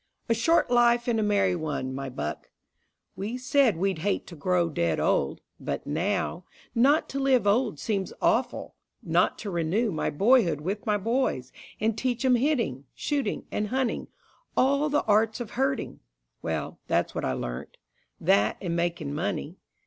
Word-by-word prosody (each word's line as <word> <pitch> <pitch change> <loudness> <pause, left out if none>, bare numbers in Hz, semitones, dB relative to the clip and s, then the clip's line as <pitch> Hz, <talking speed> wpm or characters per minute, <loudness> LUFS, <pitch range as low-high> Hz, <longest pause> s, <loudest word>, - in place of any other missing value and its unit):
A 230 - +3
short 245 +5 +2
life 240 0 +4
and 230 -2 +2
a - - +2
merry 200 -3 +2
one, 150 -5 -3
my 135 0 -4
buck! 75 - -5 0.7
We 220 +5 -4
said 255 - +3
we'd 190 -1 0
hate 200 +4 -1
to 175 - -10
grow 175 +3 +1
dead 85 - 0
old. - - +1 0.2
But - - -4
now, 175 +3 -1 0.3
Not 275 +6 +4
to 275 - -3
live 265 -5 +3
old 210 - +2
seems 200 -4 -2
awful: - - 0 0.3
not - - +2
to 205 - -5
renew 180 +7 0
My 155 - -1
boyhood 195 - +3
with 195 +7 -4
my 210 -1 +3
boys, 215 - -1 0.3
and 220 0 +1
teach 250 +2 -1
'em 255 - +5
hitting, 235 - +1
Shooting 280 -8 -2
and 210 - -1
hunting, 260 +2 -1 0.5
all 280 +3 +3
the 295 0 +1
arts 215 +1 +2
of 235 -3 -6
hurting! 270 0 -1 0.4
Well, - - -3
that's - - +1
what - - -3
I 65 - 0
learnt. 60 -1 -5 0.4
That, 100 +2 +3
and 170 -3 -2
making 170 -4 -1
money. 170 +1 -3
205 Hz, 165 wpm, -27 LUFS, 170-245 Hz, 0.7 s, em